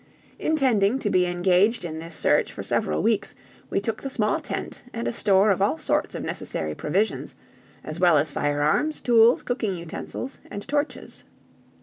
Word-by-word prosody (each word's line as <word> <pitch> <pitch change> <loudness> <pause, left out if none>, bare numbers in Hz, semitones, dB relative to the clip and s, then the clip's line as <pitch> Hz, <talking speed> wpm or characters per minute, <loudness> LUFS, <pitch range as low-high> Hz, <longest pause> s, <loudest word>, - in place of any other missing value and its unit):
Intending 255 -8 +2
to 215 -6 -2
be 180 -1 +3
engaged 180 +4 +2
in 160 -1 -5
this 165 0 -8
search - - +2
for - - -7
several 75 0 0
weeks, - - 0 0.3
we - - +1
took 215 +2 -3
the 275 - -4
small 215 -5 0
tent - - -5
and 230 0 -3
a - - -1
store 200 -2 +4
of 190 - 0
all 160 -5 +2
sorts - - -1
of - - -4
necessary 75 -1 -4
provisions, 190 - -1 0.5
as 155 +2 -6
well 175 -3 +5
as 145 +2 +1
firearms, 145 - 0
tools, 235 0 +5
cooking 225 -7 -2
utensils, 170 +9 -6
and 205 - -7
torches. 290 +2 -3
195 Hz, 165 wpm, -25 LUFS, 165-230 Hz, 0.5 s, well